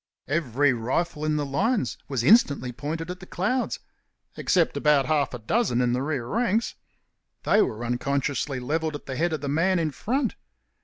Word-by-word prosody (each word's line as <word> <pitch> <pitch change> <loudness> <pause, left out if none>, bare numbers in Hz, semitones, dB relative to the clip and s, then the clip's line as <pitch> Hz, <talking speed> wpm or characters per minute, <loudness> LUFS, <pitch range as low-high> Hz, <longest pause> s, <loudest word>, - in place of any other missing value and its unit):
Every 145 -2 +2
rifle 150 +7 -2
in 155 0 +1
the 150 -1 0
lines 190 - 0
was 130 -4 -1
instantly 140 - +4
pointed 155 +6 -4
at 180 - -8
the 180 - -12
clouds 230 +8 -1 0.6
except 170 -5 +1
about 145 -1 +3
half 145 -1 +1
a - - -4
dozen 125 - 0
in 125 -1 +2
the 125 - 0
rear 140 -4 -2
ranks. 225 - 0 0.7
They 210 - +4
were 115 - -1
unconsciously 140 +2 -1
levelled 155 +4 -1
at 145 - -8
the 130 - -5
head 170 +5 +1
of 155 - -3
the 145 - -4
man 170 +6 +2
in 160 -2 0
front. 250 - -1
150 Hz, 175 wpm, -25 LUFS, 130-175 Hz, 0.7 s, instantly